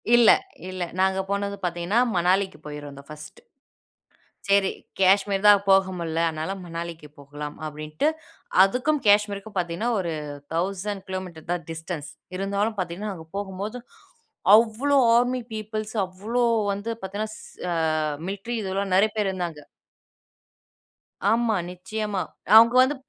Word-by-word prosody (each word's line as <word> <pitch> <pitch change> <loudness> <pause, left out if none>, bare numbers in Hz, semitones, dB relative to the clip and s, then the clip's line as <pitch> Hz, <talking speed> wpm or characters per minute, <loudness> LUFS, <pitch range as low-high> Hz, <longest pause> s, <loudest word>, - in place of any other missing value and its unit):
இல்ல. 240 -2 +7 0.4
இல்ல. 185 -1 -3 0.2
நாங்க 190 0 +2
போனது 200 0 -1
பாத்தீங்கன்னா, 175 +6 0 0.2
மணாலிக்கு 185 +2 +2
போயிருந்தோம் 145 -2 -8
ஃபர்ஸ்ட், 150 - -10 1.1
சரி 200 -1 +4 0.3
காஷ்மீர் 195 +1 +3
தான் 205 -1 +8
போக 190 -1 +5
முடில, 165 -1 -2
அதனால 160 +4 -3
மணாலிக்கு 165 -2 -6
போகலாம் 145 +1 -7
அப்டின்னுட்டு, 155 - -2 0.6
அதுக்கும் 260 +9 +1
காஷ்மீருக்கும் 205 0 +2
பாத்தீங்கன்னா, 175 +6 -1
ஒரு 170 -3 -2 0.4
1000KM 185 -2 -4
தான் 175 -3 -2
டிஸ்டன்ஸ். 160 -2 -6 0.3
இருந்தாலும் 200 +2 -1
பாத்தீங்கன்னா, 185 +4 -3
நாங்க 160 -2 -11
போகும்போது, 200 +3 -4 0.8
அவ்ளோ 235 +6 +3 0.2
ஆர்மி 245 +1 +2
பீப்பிள்ஸ் 215 0 -4
அவ்ளோ 210 +7 -3 0.3
வந்து 205 +3 -5
பாத்தனா 200 +3 -3
ச - - -11 0.9
மில்ட்டரி 200 +5 -4
இதெல்லாம், 195 0 -2
நெறைய 215 +3 +4
பேர் 210 -2 +1
இருந்தாங்க! 170 -5 -5 1.7
ஆமா, 230 -1 +2
நிச்சயமா. 195 +2 -3 0.3
அவங்க 230 +2 +9
வந்து 285 +3 0
195 Hz, 115 wpm, -25 LUFS, 170-215 Hz, 1.7 s, அவங்க